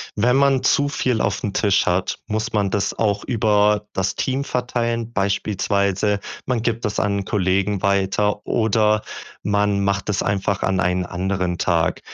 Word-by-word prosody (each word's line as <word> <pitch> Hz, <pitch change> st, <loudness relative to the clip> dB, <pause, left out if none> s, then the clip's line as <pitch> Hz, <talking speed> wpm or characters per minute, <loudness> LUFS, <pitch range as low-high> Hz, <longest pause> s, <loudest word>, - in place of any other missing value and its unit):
Wenn 120 Hz, +4 st, +2 dB
man 135 Hz, -1 st, +3 dB
zu 145 Hz, 0 st, +3 dB
viel 125 Hz, -5 st, 0 dB
aufm 100 Hz, -, -1 dB
Tisch 100 Hz, -2 st, +2 dB
hat, 90 Hz, +1 st, 0 dB
muss 110 Hz, +2 st, -2 dB
man 100 Hz, -2 st, 0 dB
das 100 Hz, -, -1 dB
auch 105 Hz, -2 st, 0 dB
über 105 Hz, -3 st, +2 dB
das 95 Hz, 0 st, -1 dB
Team 135 Hz, +1 st, -1 dB
verteilen, 120 Hz, -2 st, -2 dB
beispielsweise 100 Hz, 0 st, 0 dB, 0.3 s
man 125 Hz, -3 st, 0 dB
gibt 115 Hz, 0 st, -1 dB
es 105 Hz, -1 st, -1 dB
an 100 Hz, -2 st, 0 dB
Kollegen 95 Hz, +1 st, 0 dB
weiter, 100 Hz, +1 st, +1 dB
oder 110 Hz, -1 st, +2 dB, 0.4 s
man 100 Hz, -1 st, +1 dB
macht 100 Hz, 0 st, -1 dB
es 100 Hz, -, 0 dB
einfach 100 Hz, -1 st, -1 dB
an 95 Hz, -1 st, +1 dB
einen 90 Hz, 0 st, +1 dB
anderen 90 Hz, -1 st, -2 dB
Tag. 85 Hz, 0 st, +1 dB
105 Hz, 155 wpm, -21 LUFS, 95-110 Hz, 0.4 s, man